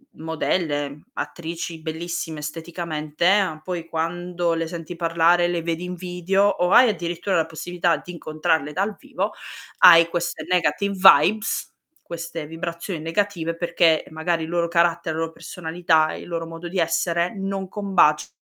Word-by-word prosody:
m 160 - -12
modelle, 150 -3 -2
attrici 165 -3 -5
bellissime, 160 -1 -4
esteticamente, 165 +2 -1
poi 175 -2 -5
quando 170 +1 -2
le 165 0 -2
senti 170 0 -7
parlare, 170 +1 +3
le 175 -1 -1
vedi 170 +1 -2
in 180 0 -5
video, 180 +2 0
o 180 -2 +1
hai 250 -1 +7
addirittura 175 -1 -2
la 160 - +2
possibilità 170 0 -1
di 175 - -10
incontrarle 155 -2 -1
dal 200 +3 -1
vivo, - - -3 0.5
hai 170 -2 +9
queste 170 -2 -3
negative 180 +3 +1
vibes, 190 +3 +4 0.3
queste 165 -2 -6
vibrazioni 170 +2 -5
negative, 165 0 -1
perché 165 -2 +2
magari 160 +1 -1
il 160 - -6
loro 170 0 0
carattere, 170 -1 +1
la 165 - -2
loro 165 0 -2
personalità, 160 -2 0
il - - -8
loro 165 -1 -3
modo 165 +1 -8
di 185 +2 -5
essere 170 +1 +1
non 195 0 -3
combacia 190 -7 +2
170 Hz, 145 wpm, -23 LUFS, 160-180 Hz, 0.5 s, hai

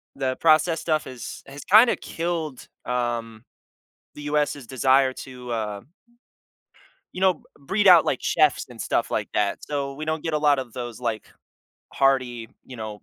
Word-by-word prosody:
the 130 -2 -1
processed 160 +1 +3
stuff 155 -2 0
is 125 -2 -8
has 140 +1 -10
kinda 220 +5 +6
killed, 165 -5 -4 0.2
um, 120 -2 -3 0.7
the 145 - -9
US's 145 -2 -1
desire 130 +1 +3
to, 125 -2 -9
uh 105 -3 -3 1.3
you 180 - -6
know, 190 -1 +5
b - - -23 0.2
breed 195 +9 +1
out, 175 -3 +8
like, 130 - 0
chefs 150 -4 +2
and 120 -2 -13
stuff - - -1
like - - -2
that. 100 -1 0
So 140 -2 -3
we 155 +2 -6
don't 155 0 -2
get 160 - -2
a - - +2
lot 145 -2 +3
of 125 -4 -7
those, 120 -2 -6
like, 115 -3 -3 0.7
hearty, 130 -4 +1 0.2
you 130 - -11
know 110 -2 -7
135 Hz, 165 wpm, -24 LUFS, 120-155 Hz, 1.3 s, out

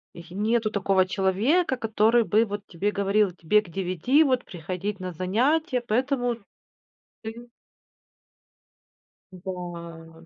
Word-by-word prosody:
й 170 +1 -11
нету 220 +2 +1
такого 195 -2 +2
человека, 210 - +1
который 225 +1 +3
бы 220 +1 +3
вот 205 -1 -6
тебе 200 +4 -1
говорил: 200 0 +2
"Тебе 180 +5 +2
к - - -15
девяти 190 - +2
вот 255 -4 +1
приходить 185 +4 -5
на 185 -1 -4
занятия, 250 - +1
поэтому 245 +1 0 0.9
ты" 230 +2 -8 1.9
Да. 170 -3 -8
205 Hz, 110 wpm, -26 LUFS, 180-235 Hz, 1.9 s, который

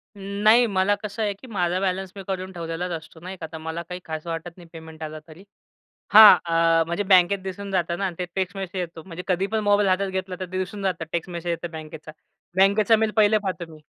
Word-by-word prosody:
अं, 200 - -12 0.2
नाही 230 +3 +6
मला 195 0 +2
कसं 210 +1 -5
आहे 205 -1 0
की 205 +6 -15
माझा 180 -5 -1
बॅलन्स 190 0 -2
मी 195 - -7
करून 190 -1 -4
ठेवलेलाच 170 +1 -4
असतो 165 0 -7
नाही 185 +3 -8
का. 165 - -6
तर 160 - -6
मला 160 +1 -5
काही 180 0 -5
खास 160 0 -6
वाटत 165 +1 -5
नाही 175 -2 -14
पेमेंट 160 -1 -10
आला 155 0 -6
तरी. 165 +4 -14 0.7
हां 215 0 +11
अ, 165 -1 +3
म्हणजे 170 +4 -1
बँकेत 185 +2 +5
दिसून 195 +1 -6
जातं 175 -2 0
ना 195 -2 -1
ते 180 - -1
टेक्स्ट 190 -1 -2
मेसेज 190 -1 -4
येतो. 165 -2 -6
म्हणजे 180 -1 -7
कधी 185 +1 +1
पण 220 - +2
मोबाईल 205 -1 +4
हातात 190 +1 +1
घेतला 190 0 -4
तर - - -2
ते 185 - -2
दिसून 195 +2 -4
जातं. 180 -4 -1
टेक्स्ट 170 +1 -3
मेसेज 170 0 -4
येतो 170 +1 -3
बँकेचा. 155 0 -10 0.4
बँकेचा 200 +3 +4
मेल 220 0 +1
पहिले 215 0 +5
पाहतो 180 -3 -4
मी. 155 - -14
185 Hz, 230 wpm, -24 LUFS, 165-195 Hz, 0.7 s, हां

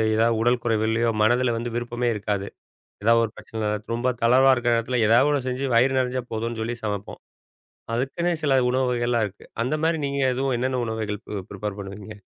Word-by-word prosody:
ஏதாவது 115 0 +3
உடல் 120 +1 +2
குறைவுல்லையோ 115 0 +1
மனதில 120 +2 +3
வந்து 120 0 -4
விருப்பமே 120 0 -2
இருக்காது. 100 -1 -2 0.6
ஏதாவது 115 +1 +5
ஒரு 110 - -8
பிரச்சனை 110 -1 -5 0.3
ரொம்ப 125 +2 0
தளர்வா 130 +3 +6
இருக்கிற 120 -1 +1
நேரத்துல, 115 +1 0
எதாவது 125 +6 +5
ஒண்ணு 140 -3 0
செஞ்சு 130 +2 -2
வயிறு 130 +3 +4
நெறஞ்சா 125 0 -1
போதும்னு 115 +1 -3
சொல்லி 115 +2 -2
சமப்போம். 105 -2 -4 0.7
அதுக்குன்னே 170 +8 -1
சில 135 -3 +4
உணவு 130 +1 +1
வகைகள்லாம் 120 -2 +1
இருக்கு. 100 +1 -15 0.2
அந்த 130 +5 0
மாரி 165 0 +2
நீங்க 140 0 -2
எதுவும் 130 0 0
என்னன்ன 130 -1 0
உணவுகள் 110 -2 -3
ப் 100 -2 -5
ப்ரிப்பேர் 105 0 -5
பண்ணுவீங்க? 100 +1 -9
120 Hz, 175 wpm, -24 LUFS, 110-130 Hz, 0.7 s, தளர்வா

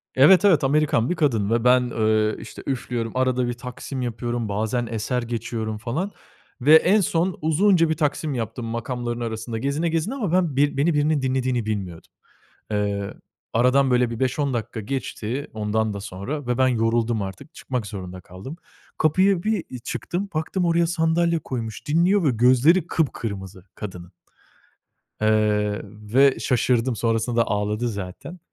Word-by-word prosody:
Evet, 180 +9 +7
evet. 175 -8 +5
Amerikan 145 -3 +2
bir 180 - 0
kadın 115 - +1
ve 115 0 +1
ben, 125 0 +5
eee, 110 -1 +1
işte - - -10
üflüyorum. 120 -4 -2
Arada 130 -1 +1
bir 120 - -1
taksim 125 +2 -7
yapıyorum. 120 -2 -3
Bazen 110 +4 -1
eser 115 +3 -2
geçiyorum 115 -2 -4
falan 140 - -3 0.5
ve 150 +5 +7
en 195 +6 +5
son 175 +1 0
uzunca 165 +2 +3
bir - - +3
taksim 150 0 -1
yaptım 115 0 -4
makamların 120 +1 -3
arasında 115 0 -4
gezine, 140 +7 -1
gezine 165 +8 -1
ama 215 -11 -2
ben 175 -5 +1
bir 145 0 +2
beni 155 +5 +2
birinin 150 -1 +2
dinlediğini 130 -3 0
bilmiyordum. 95 -6 -5 0.6
Eee, 100 -1 -1 0.4
aradan 125 +3 +3
böyle 125 -1 +3
bir 115 - -6
5-10 135 +1 0
dakika 110 -1 -3
geçti 130 +3 -4
ondan 110 0 -1
da 100 - -5
sonra 120 +10 -5
ve 125 +1 -1
ben 130 - +4
yoruldum 115 -2 +1
artık 95 +10 -8
çıkmak 125 -5 -4
zorunda 95 -3 -7
kaldım. 95 - -10 0.4
Kapıya 185 +4 +3
bir 205 - -2
çıktım 175 - -3
baktım 170 +4 -1
oraya 170 0 +3
sandalye 170 0 +1
koymuş 120 -3 -6
dinliyor 175 +5 +3
ve 140 - +4
gözleri 130 +9 +4
kıpkırmızı 100 - -3
kadının. 90 -3 -8 1.1
Eee, 105 -1 +2
ve 110 +7 +2
şaşırdım 125 -1 +1
sonrasında 115 +1 +1
ağladı 105 +3 -1
zaten 100 - -7
125 Hz, 150 wpm, -23 LUFS, 110-150 Hz, 1.1 s, Evet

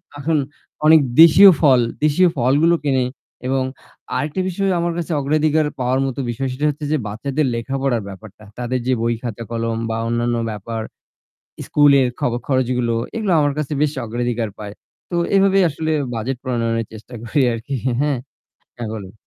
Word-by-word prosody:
আহ - - -8
এখন 160 0 +1 0.5
অনেক 160 0 +8 0.2
দেশীয় 190 +4 +9
ফল 135 -5 +5 0.3
দেশীয় 175 +4 +4
ফলগুলো 145 +8 +3
কিনি। 130 -3 +2 0.4
এবং 135 0 +1 0.5
আরেকটা 150 +7 -2
বিষয় 195 +1 -1
আমার 170 0 -1
কাছে 170 0 -4
অগ্রাধিকার 155 +2 +1
পাওয়ার 130 +1 +1
মতো 135 0 -4
বিষয় 130 +3 -2
সেটা 145 +4 -2
হচ্ছে 150 +1 -4
যে 155 - +2
বাচ্চাদের 135 +8 -2
লেখাপড়ার 135 0 -1
ব্যাপারটা। 105 +2 -12 0.2
তাদের 125 +1 -1
যে 130 - +3
বই, 115 0 +1
খাতা, 115 -1 -5
কলম 115 0 -2
বা 110 - -2
অন্যান্য 120 0 0 0.2
ব্যাপার, 110 +2 -5 0.9
স্কুলের 140 -3 +4
খব 120 - 0
খরচগুলো। 125 -3 0 0.2
এগুলো 210 -5 0
আমার 145 -1 +2
কাছে 150 -1 -3
বেশ 150 -1 +1
অগ্রাধিকার 120 -1 -2
পায়। 105 -1 -7 0.4
তো 175 - -2 0.2
এভাবেই 195 0 +4
আসলে 155 +2 -2 0.2
বাজেট 120 +4 -3
প্রণয়নের 115 -3 -1
চেষ্টা 110 +3 -12
করি 125 +5 0
আর 115 - -3
কি 140 - -3 0.3
হ্যাঁ? 145 -3 +1 0.6
হ্যাঁ 120 -2 -5
বলেন। 100 -3 -8
130 Hz, 160 wpm, -20 LUFS, 115-150 Hz, 0.9 s, দেশীয়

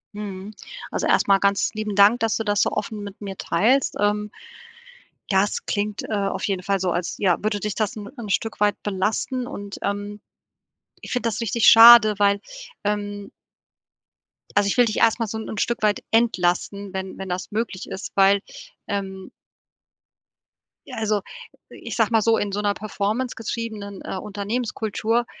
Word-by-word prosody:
Mhm. 205 0 -7 0.4
Also, - - -1
erst - - +3
mal 195 -1 +5
ganz 200 0 +1
lieben 215 -2 -4
Dank, 205 +4 +6
dass 225 -3 +1
du 225 - -2
das 205 -2 +1
so - - +3
offen 210 0 -4
mit 200 -1 -9
mir 195 -2 -6
teilst, 245 +10 +1
ähm. 210 0 0 1.0
Das 195 +2 +1
klingt, 205 0 -2
äh, - - -8
auf 200 -1 -1
jeden 185 -2 -2
Fall 195 0 0
so, 185 -1 0
als, 170 0 -2
ja, 185 -4 +2
würde 210 -1 -1
dich 210 +1 -3
das 215 -1 -1
'n 205 -1 -7
'n 220 -4 -6
Stück 225 +2 -1
weit 205 0 +2
belasten 215 +6 -1
und, 205 -7 -7
ähm, 205 +1 -3 0.8
ich - - -7
finde 250 -2 0
das 225 - -4
richtig 230 +1 0
schade, 225 -2 +9
weil, 200 0 +3 0.4
ähm 205 -1 -3 1.3
also 205 -1 +4
ich 200 - -1
will 245 - +6
dich 215 - -2
erst 230 +1 +3
mal 230 - -1
so 220 +2 -5
'n 220 - -6
'n 220 - -6
Stück 235 +2 -1
weit 210 -1 +1
entlasten, 200 -3 +1
wenn 190 0 -5
wenn 190 - -6
das 180 +3 -4
möglich 215 -3 -3
ist, 190 - -6
weil, 195 0 +5 0.5
ähm 190 -1 -4 1.6
ja, - - -8
also, 215 -2 0 0.5
ich - - -8
sage - - +2
mal 225 -1 +4
so, 225 +1 +3
„in 205 -1 -2
so 205 - -2
'ner 205 -1 +1
Performance 215 +4 -3
getriebenen, 215 -3 -5
äh, - - -5
Unternehmenskultur, 220 +2 -2
205 Hz, 175 wpm, -23 LUFS, 200-220 Hz, 1.6 s, schade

